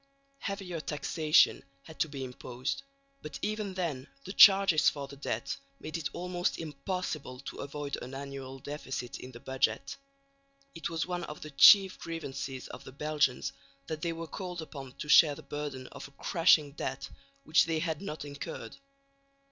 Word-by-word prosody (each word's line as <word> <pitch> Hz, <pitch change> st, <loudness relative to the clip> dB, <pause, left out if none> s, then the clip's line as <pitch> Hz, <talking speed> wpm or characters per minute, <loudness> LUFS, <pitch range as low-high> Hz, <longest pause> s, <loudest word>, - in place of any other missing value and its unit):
Heavier 195 Hz, -4 st, -4 dB
taxation 155 Hz, +1 st, +3 dB, 0.2 s
had 160 Hz, -, -13 dB
to 165 Hz, -, +1 dB
be 140 Hz, -2 st, -5 dB
imposed, 125 Hz, -, -4 dB, 0.4 s
but 150 Hz, -, -7 dB
even 210 Hz, -2 st, -2 dB
then 155 Hz, -8 st, -2 dB, 0.2 s
the 195 Hz, -, -5 dB
charges 195 Hz, -7 st, +8 dB
for 140 Hz, -1 st, -6 dB
the 140 Hz, -, -10 dB
debt 125 Hz, -4 st, -3 dB, 0.2 s
made 155 Hz, -, -6 dB
it 165 Hz, -3 st, -2 dB
almost 180 Hz, 0 st, -1 dB
impossible 155 Hz, -3 st, -4 dB
to -, -, -8 dB
avoid 145 Hz, 0 st, -4 dB
an 130 Hz, +2 st, -7 dB
annual 135 Hz, -1 st, -6 dB
deficit 135 Hz, -3 st, -5 dB
in 130 Hz, -, -9 dB
the 120 Hz, -, -11 dB
budget. 130 Hz, -4 st, 0 dB, 0.8 s
It 165 Hz, 0 st, -4 dB
was 165 Hz, -2 st, -1 dB
one 180 Hz, -1 st, -3 dB
of 150 Hz, -, -8 dB
the 155 Hz, -, -8 dB
chief 190 Hz, +6 st, +8 dB
grievances 140 Hz, -5 st, -5 dB
of -, -, -9 dB
the -, -, -10 dB
Belgians 145 Hz, -2 st, 0 dB, 0.3 s
that 155 Hz, 0 st, -5 dB
they 170 Hz, -, 0 dB
were 165 Hz, 0 st, -5 dB
called 180 Hz, +1 st, -6 dB
upon 135 Hz, -4 st, -9 dB
to 150 Hz, -, -7 dB
share 150 Hz, 0 st, +7 dB
the 160 Hz, -, -11 dB
burden 140 Hz, -2 st, -5 dB
of -, -, -8 dB
a 140 Hz, -, -23 dB
crushing 165 Hz, -4 st, +4 dB
debt 140 Hz, -1 st, -4 dB, 0.4 s
which 155 Hz, +1 st, +5 dB
they 165 Hz, -1 st, 0 dB
had 160 Hz, -1 st, -2 dB
not 155 Hz, -6 st, -5 dB
incurred. 140 Hz, 0 st, -7 dB
150 Hz, 165 wpm, -31 LUFS, 140-165 Hz, 0.8 s, charges